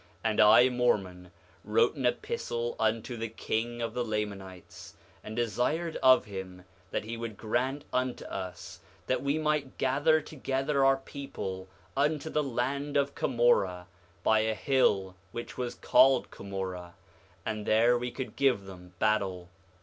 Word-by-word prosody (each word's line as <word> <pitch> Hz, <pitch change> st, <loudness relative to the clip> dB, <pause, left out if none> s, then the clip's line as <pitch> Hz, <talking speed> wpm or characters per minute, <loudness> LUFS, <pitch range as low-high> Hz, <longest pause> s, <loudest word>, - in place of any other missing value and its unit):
6:2 110 Hz, -, +3 dB
And 105 Hz, -, -2 dB
I, 110 Hz, +4 st, +7 dB
Mormon, 95 Hz, -8 st, 0 dB, 0.3 s
wrote 460 Hz, 0 st, +2 dB
an -, -, +1 dB
epistle 270 Hz, -, -2 dB
unto 115 Hz, +2 st, 0 dB
the 115 Hz, 0 st, -4 dB
king 115 Hz, +2 st, -3 dB
of 115 Hz, -, -3 dB
the 125 Hz, -, -1 dB
Lamanites, 100 Hz, -5 st, -6 dB, 0.3 s
and 110 Hz, -, -7 dB
desired 125 Hz, +8 st, -1 dB
of 130 Hz, -1 st, +6 dB
him 95 Hz, -3 st, -8 dB, 0.2 s
that -, -, -2 dB
he 115 Hz, +2 st, -5 dB
would 115 Hz, -2 st, -6 dB
grant 130 Hz, +6 st, -1 dB
unto 130 Hz, -1 st, -1 dB
us 95 Hz, -2 st, -7 dB, 0.3 s
that 130 Hz, -, 0 dB
we 140 Hz, +2 st, 0 dB
might 150 Hz, -3 st, -1 dB
gather 145 Hz, +4 st, +3 dB
together 135 Hz, -1 st, -1 dB
our 135 Hz, 0 st, +5 dB
people 95 Hz, -9 st, -6 dB, 0.3 s
unto 150 Hz, +2 st, 0 dB
the 150 Hz, -, +1 dB
land 140 Hz, +2 st, -1 dB
of 140 Hz, 0 st, +1 dB
Cumorah, 110 Hz, -8 st, +2 dB, 0.4 s
by 110 Hz, -, +4 dB
a 110 Hz, 0 st, 0 dB
hill 100 Hz, -8 st, +2 dB, 0.2 s
which 120 Hz, -, -6 dB
was 125 Hz, -1 st, -3 dB
called 130 Hz, 0 st, +4 dB
Cumorah, 95 Hz, -3 st, -6 dB, 0.5 s
and 110 Hz, -1 st, -3 dB
there 115 Hz, +3 st, +4 dB
we 120 Hz, +1 st, -2 dB
could 130 Hz, +1 st, -6 dB
give 130 Hz, -8 st, +2 dB
them 90 Hz, -1 st, -12 dB
battle. 95 Hz, -5 st, 0 dB
120 Hz, 150 wpm, -29 LUFS, 100-135 Hz, 0.5 s, I